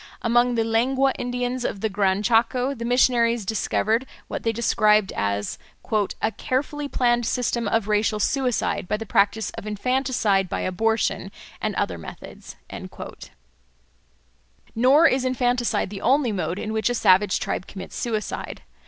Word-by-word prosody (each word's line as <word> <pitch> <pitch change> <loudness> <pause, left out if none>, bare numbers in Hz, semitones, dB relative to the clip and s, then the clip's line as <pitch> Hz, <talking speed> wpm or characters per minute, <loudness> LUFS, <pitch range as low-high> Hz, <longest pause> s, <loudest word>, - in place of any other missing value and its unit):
Among 240 +1 +3
the 225 - +2
Lengua 260 +4 +2
Indians 245 0 -2
of 195 - -3
the 220 - +1
Gran 200 -1 0
Chaco, 240 +4 +2
the 235 -4 -7
missionaries 235 -2 +3
discovered 220 +4 0 0.2
what - - -4
they 225 - 0
describe 215 -3 +2
as 100 0 -2 0.6
"a 220 - 0
carefully 285 +6 -2
planned 240 -3 +1
system 240 -3 -1
of 225 0 0
racial 210 0 +1
suicide, 250 -4 0
by 210 - 0
the 225 - -6
practice 210 +2 +1
of 215 - -8
infanticide 210 -3 0
by - - -2
abortion, 215 +1 0 0.3
and 215 -2 -2
other 85 - -2
methods." 80 - -10 2.2
Nor 265 +8 +5
is 260 -4 +3
infanticide 245 -5 0
the 200 - -7
only 265 -1 +2
mode 185 -2 -2
in 215 +1 -4
which 220 +2 +1
a 245 - 0
savage 190 -2 +4
tribe 185 - -3
commits 190 -2 -9
suicide. 220 -3 -4
225 Hz, 145 wpm, -23 LUFS, 210-250 Hz, 2.2 s, Nor